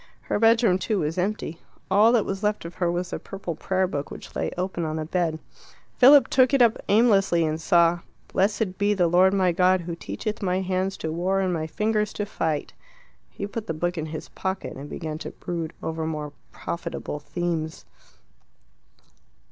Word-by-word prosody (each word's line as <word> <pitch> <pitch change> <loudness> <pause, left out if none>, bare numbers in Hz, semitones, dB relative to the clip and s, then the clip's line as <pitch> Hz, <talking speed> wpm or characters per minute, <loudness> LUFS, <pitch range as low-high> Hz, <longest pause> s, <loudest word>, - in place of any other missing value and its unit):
Her - - -2
bedroom, 225 -4 +4
too, 200 +1 0
was 160 +4 -2
empty. 180 -4 -2 0.3
All 210 +4 +6
that 235 -4 +3
was 195 0 -3
left 210 -4 -1
of 170 - -7
her 175 -1 0
was 175 +1 -3
the - - -3
purple 195 -3 -6
prayer 190 +4 0
book 145 -6 -4
which - - -10
lay - - -1
open 180 -1 -2
on 155 -1 -2
the 155 -1 -3
bed. 165 -1 0 0.6
Philip 275 +2 +8
took 260 +1 +4
it 270 - +3
up 230 -1 +3
aimlessly, 195 -6 +4
and 155 +1 -2
saw 170 -1 +4 0.3
"Blessed 195 0 0
be 205 +1 +2
the 180 -3 +3
Lord 180 +3 +5
my 190 -2 +2
God 185 +1 +3
who 170 0 -5
teacheth 215 +5 -5
my 185 -1 0
hands 190 +1 -1
to 160 - -3
war 185 +4 0
and 185 -2 0
my 160 -2 -2
fingers 210 +4 0
to 205 - -3
fight." 160 -7 -2 0.6
He 200 - -6
put 210 +2 -6
the 165 - -2
book 175 +3 -1
in 160 -2 -3
his 155 0 -7
pocket, 190 0 -4
and 140 +2 -8
began 155 -2 -5
to - - -5
brood 170 -2 -5
over 160 0 -3
more 150 -2 -4 0.2
profitable 170 -3 -5
themes. 160 0 -3
180 Hz, 190 wpm, -25 LUFS, 165-205 Hz, 0.6 s, Philip